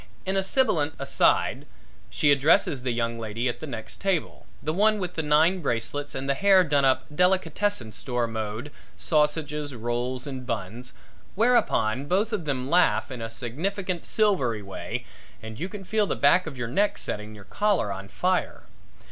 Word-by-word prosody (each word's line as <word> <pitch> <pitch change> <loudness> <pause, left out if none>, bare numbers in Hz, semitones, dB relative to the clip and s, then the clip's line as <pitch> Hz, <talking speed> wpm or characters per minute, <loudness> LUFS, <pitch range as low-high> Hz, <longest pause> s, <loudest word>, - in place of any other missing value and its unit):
In 190 +1 -1
a 195 - +3
sibulent 190 - +1
aside, - - +1 0.4
she 145 - +2
addresses 140 -1 +3
the 130 - -2
young 115 0 -2
lady 115 +2 -2
at 120 - -3
the 155 - -6
next 115 -5 -7
table 195 -5 -2 0.2
the 155 - -1
one 215 +4 +3
with 180 -3 -3
the 160 - -1
nine 160 +5 +3
bracelets 140 +2 -2
and 135 +1 -3
the 140 - +3
hair 195 +3 +5
done 145 -4 +2
up 135 -1 +3
delicatessen 180 - +1
store 120 +1 -1
mode 110 +4 -5 0.3
sausages, 150 -2 0
rolls 120 +3 -3
and 130 -3 -6
buns 115 +2 -4 0.4
whereupon 140 - +2
both 205 +6 +1
of 175 -6 -2
them 130 -3 -2
laugh 170 -3 +3
in 125 -2 -6
a 115 - -4
significant, 170 - -3
silvery 135 - +1
way, 95 -1 -5 0.3
and 110 0 -9
you 180 +4 -3
feel 205 +2 -1
the - - -1
back 165 +5 +4
of 140 -4 -7
your 120 -1 -3
neck 200 - +1
setting 105 +1 -5
your 100 - -12
collar 185 - 0
on 95 0 -8
fire. 180 - -1
145 Hz, 170 wpm, -26 LUFS, 120-185 Hz, 0.4 s, hair